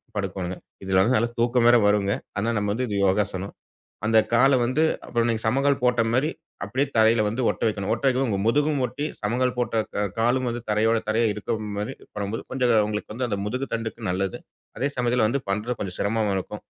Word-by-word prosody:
படுக்கோணுங்க. 95 -3 -3 0.3
இதுல 95 0 +3
வந்து 120 +7 +3
நல்ல 115 +2 +2
தூக்கம் 120 0 +2
வேற 120 0 +7
வருங்க. 105 -1 +2 0.3
ஆனா 115 +3 0
நம்ம 105 0 -1
வந்து 125 +4 -1
இது 105 - -3
யோகாசனம். 95 0 0 0.5
அந்த 110 0 +4 0.2
கால 135 +2 +5
வந்து, 130 +6 +1 0.2
அப்புறம் 120 -1 0
நீங்க 115 -1 -2
சம்மணங்கால் 135 +4 +2
போட்ட 125 -1 +3
மாரி, 140 +5 +2 0.3
அப்டியே 130 +8 0
தரைல 110 0 +5
வந்து 115 +5 -3
ஒட்ட - - -6
வைக்கணும். 100 -2 -3
ஒட்ட - - -8
வைக்கம் 130 +1 +1
போ - - -1
உங்க 100 - 0
முதுகும் 145 +3 +2
ஒட்டி, 135 +5 -4
சம்மணங்கால் 125 +4 0
போட்ட 115 -2 +1
கா 100 - +1 0.2
காலும் 125 +3 +2
வந்து 120 +1 -4
தரையோட 110 +2 +2
தரையா 115 +2 +2
இருக்க 110 +2 -3 0.2
மாரி 105 - -3 0.2
பண்ணம்போது, 100 +2 -3
கொஞ்சம் 125 -2 +2
உங்களுக்கு 105 0 -4
வந்து 125 +1 -2
அந்த 100 -3 -2
முதுகு 125 +5 -3
தண்டுக்கு 115 -1 -4
நல்லது. 95 +1 -2 0.4
அதே 140 +2 0
சமயத்துல 120 -2 +2
வந்து 140 +5 0
பண்றது 110 +4 -2
கொஞ்சம் 95 -3 -4
சிரமமா 105 -1 0
இருக்கும். 105 +3 -7
115 Hz, 195 wpm, -24 LUFS, 105-125 Hz, 0.5 s, வேற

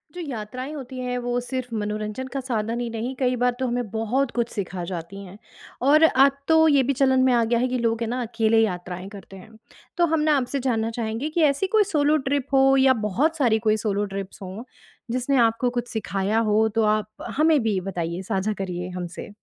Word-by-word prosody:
जो 355 - -5
यात्राएँ 255 +3 -6
होती 260 -3 -7
हैं, 250 0 -2
वो 245 0 -1
सिर्फ़ 250 -1 -5
मनोरंजन 215 +4 -3
का 275 - -2
साधन 230 -2 -2
ही 240 -1 -3
नहीं, 230 +3 -4
कई 255 -1 0
बार 245 0 +4
तो 260 - 0
हमें 240 -3 -2
बहुत 230 +4 -1
कुछ 235 -1 0
सिखा 185 -3 -4
जाती 180 +3 -6
हैं। 190 +2 -12 0.4
और 295 +5 +5
अब 275 -3 +5
तो 320 0 +5
ये 285 -3 +4
भी 275 +2 0
चलन 265 0 +3
में 260 - +4
आ 235 -1 +3
गया 230 +1 +1
है 255 - +1
कि 255 - -1
लोग 230 0 0
है 230 - -1
ना, 250 +2 -2
अकेले 225 -1 +1
यात्राएँ 180 -2 -4
करते 195 -1 -12
हैं। 190 +4 -14 0.5
तो 345 - +4
हम 320 - +3
ना, 305 0 +3
आपसे 270 +1 -2
जानना 230 -4 0
चाहेंगे 230 +5 -2
कि 330 +2 -1
ऐसी 285 +8 -2
कोई 425 - +6
सोलो 300 0 +3
ट्रिप 280 -2 0
हो 270 0 +5
या 265 0 +5
बहुत 295 - 0
सारी 235 -7 +2
कोई 215 0 +4
सोलो 205 0 0
ट्रिप्स 195 0 -6
हों, 190 +4 -7 0.5
जिसने 255 +3 0
आपको 230 +2 +1
कुछ 240 0 -2
सिखाया 205 0 -1
हो? 220 0 +2
तो 225 +1 0
आप 210 - -5 0.3
हमें 310 0 +4
भी 210 -4 +1
बताइए 175 -2 -4
साझा 195 +2 -1
करिए 180 -1 -5
हमसे। 180 +4 -6
235 Hz, 215 wpm, -24 LUFS, 210-265 Hz, 0.5 s, कोई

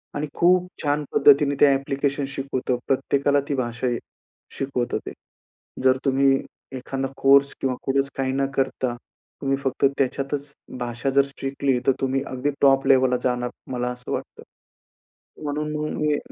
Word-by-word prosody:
आणि 150 +1 -2
खूप 180 +1 +3 0.2
छान 145 0 +1
पद्धतीने 145 0 +5
ते - - +9
ॲप्लिकेशन 140 +1 -1
शिकवतो. 135 -2 -2
प्रत्येकाला 140 +1 +2
ती 140 - -1
भाषा 120 -1 -2 0.7
शिकवतो 125 -3 -1
ते. - - -5 0.7
जर 130 0 +5
तुम्ही 135 0 +3 0.4
एखादा 135 +1 -3
कोर्स 140 +1 +5
किंवा 130 -1 0
कुठेच 135 0 +1
काही 130 -1 0
न 135 0 +1
करता 130 -2 -1 0.5
तुम्ही 135 -1 +1
फक्त 135 +1 +1
त्याच्यातच 140 +2 -2 0.3
भाषा 120 +2 -2
जर 140 - +7 0.2
शिकली 135 -1 0
तर - - +7
तुम्ही 135 0 0
अगदी 130 +3 -2
टॉप 135 -1 +5
लेव्हलला 130 -2 +4
जाणार 125 -1 0 0.2
मला 125 -1 -2
असं 125 0 -8
वाटतं. - - -5 1.0
म्हणून 150 +1 -2
मग 150 0 -2
मी 150 -1 +2
135 Hz, 145 wpm, -23 LUFS, 130-140 Hz, 1.0 s, ते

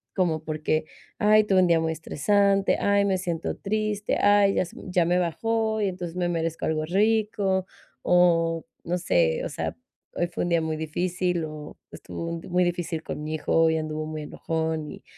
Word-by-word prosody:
como 165 -5 0
porque: 155 0 -1 0.3
"Ay, 215 0 +5
tuve 195 -2 +3
un 180 - +4
día 170 -1 +4
muy 160 0 0
estresante, 195 +5 +2
ay, 200 0 +3
me 190 -2 +1
siento 170 -3 -3
triste, 210 0 -1
ay, 205 -1 +4
ya - - +2
se - - -14
ya 180 -2 +2
me 180 +1 +2
bajó 220 +5 0
y 205 -2 +1
entonces 180 -2 -6
me 175 -1 0
merezco 165 -1 -2
algo 155 -1 0
rico", 205 0 +1 0.3
o 165 -2 +3 0.2
no 175 +1 -1
sé, 85 - +1
o - - -3
sea, - - -4 0.4
"Hoy 175 - +1
fue 175 - -5
un 175 - -1
día 170 -1 +2
muy 160 0 -2
difícil 175 +2 -1
o 155 -1 -9
estuvo 170 0 -6 0.2
muy 180 +1 +3
difícil 175 -2 -2
con 150 - -5
mi 155 +1 -3
hijo, 155 - -1
hoy 160 -1 +4
anduvo 155 0 -3
muy 155 -1 -5
enojón", 160 0 -3
y - - -11
175 Hz, 185 wpm, -25 LUFS, 160-195 Hz, 0.4 s, Ay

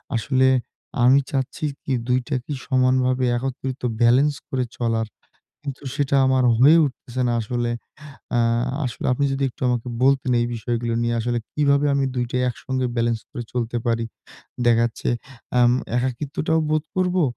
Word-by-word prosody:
আসলে 130 +3 +2 0.6
আমি 130 +3 +6
চাচ্ছি 135 +2 -2 0.2
কী 135 - -2
২টাকে 125 +2 -1
সমানভাবে 130 -1 +2
একত্রিত 130 +1 -4 0.2
balence 135 +5 +4
করে 130 -2 -1
চলার। 115 -2 0 0.6
কিন্তু 140 +1 -6
সেটা 140 -1 +1
আমার 130 -1 +3
হয়ে 145 +6 +7
উঠতেছে 130 -2 -4
না - - +1
আসলে। 120 +2 -2 0.7
আ - - +3 0.5
আসলে 120 - -4
আপনি 140 +3 +1
যদি 135 0 -2
একটু - - -28
আমাকে 125 0 -1
বলতেন 135 -1 +3
এই 120 - +1
বিষয়গুলো 115 +1 -2
নিয়ে 120 0 0
আসলে 120 +1 -1
কিভাবে 145 -1 +2
আমি 140 -1 +2
২ 125 -1 0
টা - - -2
একসঙ্গে 130 +2 -3
balence 115 -1 0
করে 125 -5 -5
চলতে 120 -1 -2
পারি. 115 0 +1 0.6
দেখা 115 -1 +5
যাচ্ছে 115 - -5 0.5
আ - - +5 0.4
একাকিত্বটাও 140 +5 -1
বোধ 155 0 +1
করবো 185 -1 +2
130 Hz, 150 wpm, -22 LUFS, 120-140 Hz, 0.7 s, হয়ে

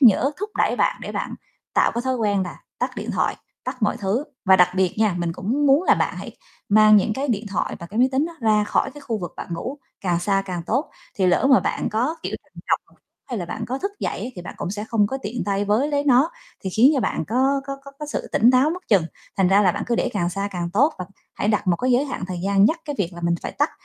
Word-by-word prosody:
nhở, 260 +2 +6
thúc 420 - -3
đẩy - - +2
bạn - - +2
để - - -6
bạn - - -3 0.4
tạo - - +3
cái 235 - -1
thói 260 0 0
quen 205 -4 +1
là 180 - -6 0.2
tắt - - 0
điện - - -4
thoại, - - 0 0.3
tắt 255 - -5
mọi 205 - +2
thứ. 205 +8 -1 0.2
Và 190 -1 +6
đặc 180 -1 +6
biệt 185 -1 +1
nha, 215 -5 +3
mình 170 -1 -1
cũng 245 +12 -1
muốn 280 +4 +5
là - - +5
bạn - - -1
hãy - - -8 0.3
mang 215 0 +7
những 210 +2 +2
cái 275 +1 -2
điện 215 -2 -1
thoại 195 - -2
và 170 - -8
cái 210 +5 -5
máy 255 +2 +5
tính 275 +4 +2
đó 340 - -8
ra 215 -2 +3
khỏi 270 - 0
cái 290 - -12
khu 230 -6 -3
vực 175 -3 -6
bạn - - -6
ngủ 260 - -5 0.2
càng 175 -3 0
xa 195 +2 +1
càng 180 -3 -4
tốt. 270 +8 0 0.2
Thì 190 - +1
lỡ 180 +8 +3
mà 265 - +7
bạn - - -1
có, 250 +9 0
kiểu, - - -3
trằn - - -32 0.2
trọc - - -1 0.3
hay 240 - -2
là 180 - -3
bạn 225 - -4
có 260 +2 -3
thức 395 +7 -2
dậy - - -2
á - - -3
thì 180 - -6
bạn - - -8
cũng - - -4
sẽ 210 +2 -4
không 215 -3 +3
có 270 +5 -3
tiện 235 +4 -3
tay 200 0 0
với 220 +8 +2
lấy 285 -1 0
nó 275 +3 +4 0.3
thì 190 - -4
khiến 240 +9 +5
cho 270 - +1
bạn 160 - -1
có 265 +4 +2
có 275 0 -4
có 275 - -10
có 300 - -5
sự 295 - -4
tỉnh 235 +3 +5
táo 260 +4 +4
mất 365 +2 -7
chừng, 195 -6 +5 0.3
thành 190 -2 +3
ra 200 +2 +5
là 180 - +4
bạn - - -3
cứ 240 - +1
để - - +1
càng 175 -4 0
xa 195 +2 -2
càng 175 -1 -3
tốt 285 +10 +3
và 180 - -3 0.3
hãy 205 - -1
đặt 210 -1 +1
một 175 - +3
cái 255 +5 0
giới 250 +3 +3
hạn 260 -9 -4
thời 185 -1 -4
gian 200 0 +4
nhắc 325 +9 +2
cái 290 -2 -4
việc 185 -3 -1
là 175 - -9
mình 170 0 +2
phải - - -4
tắt - - +1
215 Hz, 285 wpm, -23 LUFS, 195-265 Hz, 0.4 s, mang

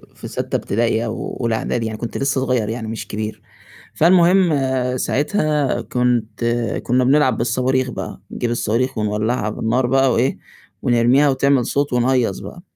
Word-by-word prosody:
في - - -9
سادسة - - -2
ابتدائي 115 +1 0
أو 115 -1 -5
أولى 115 -2 0
إعدادي 115 +1 -2
يعني 110 -1 -5
كنت 120 - -5
لسه 135 -1 0
صغيّر 125 -5 0
يعني 110 0 -4
مش 110 0 -6
كبير، 105 +1 -5 0.5
فالمهم 175 +1 +4 0.4
ساعتها 150 - 0
كنت 125 -2 -1 0.4
كنّا 125 +1 +2
بنلعب 130 -2 +3
بالصواريخ 125 +2 0
بقى - - -7
نجيب 120 - -3
الصواريخ 120 +2 -1
ونولّعها 105 +1 -1
بالنار 115 +4 0
بقى 135 +1 +3
وإيه، 125 +4 +1 0.4
ونرميها 125 +4 +3
وتعمل 135 -2 +2
صوت 140 0 -1
ونهيّص 125 -4 +1
بقى، 175 - -10
125 Hz, 145 wpm, -19 LUFS, 115-135 Hz, 0.5 s, فالمهم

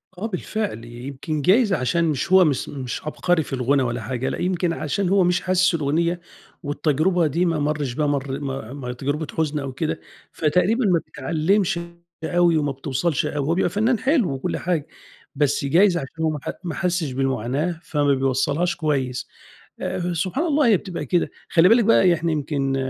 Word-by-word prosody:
آه 190 - -5
بالفعل 200 - -4
يمكن 135 +6 -5
جايز 200 - +4
عشان 165 +5 +1
مش 155 +3 -1
هو 190 -2 +7
مش- 140 -4 0
مش 130 -4 -5
عبقري 160 +1 +1
في - - -9
الغُنا 130 +2 +2
ولا 120 -1 -2
حاجة، 130 +2 -3
لأ - - -3
يمكن 180 -1 0
عشان 180 +5 -1
هو 195 -1 +4
مش 180 +1 +2
حاسس 185 0 +2
الأغنية، 170 +3 0 0.4
والتجربة 155 +4 +1
دي 170 +5 0
ما 165 -3 0
مَرش 145 -3 -1
ب 155 - -3
مر 140 -2 -1 0.3
ما 135 -3 -7
آآ 125 - -3
تجربة 145 +4 -3
حزن 155 -2 0
أو 140 -1 -4
كده، 155 +3 -2 0.3
فتقريبًا 185 - +1
ما 175 -4 +3
بتعلِّمش 170 +6 0 0.4
أوي 175 -1 +3
وما 145 -2 0
بتوصَلش 135 +4 -1
أوي، 145 -2 -2
هو 165 - +2
بيبقى 185 - +1
فنان 220 +3 +1
حلو 260 - +2
وكلّ 135 - -3
حاجة، 165 -4 -1 0.5
بس 140 -1 +1
جايز 175 +5 +4
عشان 160 +2 -5
هو 160 - +3
ما 150 - -3
ح - - -4
ما 170 - -4
حسّش 180 -5 -1
بالمعاناة 135 +5 -1
فما 145 -3 +1
بيوصّلهاش 135 +6 0
كويس. 135 -5 -1 0.5
آآ، 175 0 -2
سبحان 190 - -1
الله 295 -4 +3
هي 215 -5 +5
بتبقى 175 -6 -6
كده، 170 +6 +1 0.2
خلّي 175 +1 +5
بالِك 230 +2 +5
بقى 230 - +5
إحنا 185 - +5
يعني 170 -1 0
يمكن 140 -3 -1
160 Hz, 185 wpm, -22 LUFS, 140-180 Hz, 0.5 s, هو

